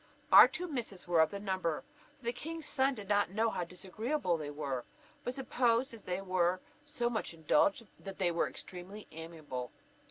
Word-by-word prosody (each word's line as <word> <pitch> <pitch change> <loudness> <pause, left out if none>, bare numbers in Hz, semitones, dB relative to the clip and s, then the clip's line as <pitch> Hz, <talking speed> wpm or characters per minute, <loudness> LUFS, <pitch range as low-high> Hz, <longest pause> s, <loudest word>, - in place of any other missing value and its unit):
Our - - +11
two 360 - -5
misses 230 - -4
were 175 -2 +3
of 160 - +4
the 200 - -5
number, 185 -5 -1 0.3
for 265 - -19
the 235 - 0
king's 325 +5 -6
son 270 0 +2
did 205 -4 -8
not 205 -1 +3
know 220 +4 +1
how - - -2
disagreeable 190 - -1
they 150 -3 -4
were, 140 -4 -3 0.4
but 245 - -3
supposed, 250 -1 +1
as 225 - -11
they 180 +1 -2
were 185 -1 +1 0.2
so 240 - -1
much 220 -7 -2
indulged, 165 +8 +3
that 195 -1 -8
they 180 -2 +2
were 170 - +1
extremely 190 +4 -9
amiable. 155 -6 -6
195 Hz, 185 wpm, -33 LUFS, 170-235 Hz, 0.4 s, Our